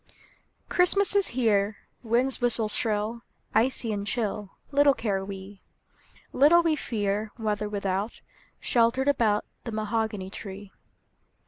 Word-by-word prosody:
CHRISTMAS 395 +3 +4
is 400 -1 +3
here; 210 -4 +1 0.3
WInds 245 +3 +1
whiste 230 -3 +1
shrill, 220 +1 -1 0.3
Icy 230 0 +1
and 200 0 -4
chill, 210 -3 -2 0.2
Little 285 -1 +5
care 195 -4 -1
we; 195 0 -9 0.7
Little 320 +6 +6
we 325 -2 +2
fear 210 -5 -2
Weather 210 -2 -2
without, 200 +1 -2 0.4
Sheltered 240 +3 +2
about 225 -7 +2 0.2
The 230 - -5
mahogany 215 -2 -2
tree. 195 0 -8
220 Hz, 115 wpm, -27 LUFS, 205-245 Hz, 0.7 s, Little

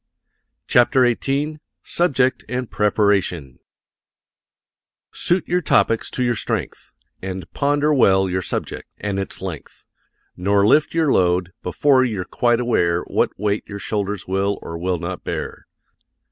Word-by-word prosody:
] - - -54
CHAPTER 125 +1 +4
XVIII 140 +5 -1 0.2
SUBJECT 135 -7 +1
AND 125 -1 -3
PREPARATION 100 - 0 1.5
Suit 175 -2 0
your 180 +1 +1
topics 115 -7 +2
to 125 - -2
your 120 -1 +2
strength, 110 - -4 0.3
And 95 0 -5
ponder 145 +1 +1
well 95 -8 +4
your 95 0 -1
subject, - - -4
and 100 -2 -3
its 95 - -5
length; 90 -5 -8 0.5
Nor 100 +2 +2
lift 150 +8 +3
your 160 -4 +2
load, 90 0 +2
before 130 +8 +3
you're 105 -7 -2
quite 120 +3 +1
aware 85 -8 +1
What - - -1
weight 105 0 -1
your 100 - -7
shoulders 100 -1 -3
will, 95 +2 0
or 85 - -6
will 90 +2 -1
not, 90 +2 -6
bear. - - -5
105 Hz, 135 wpm, -21 LUFS, 95-130 Hz, 1.5 s, CHAPTER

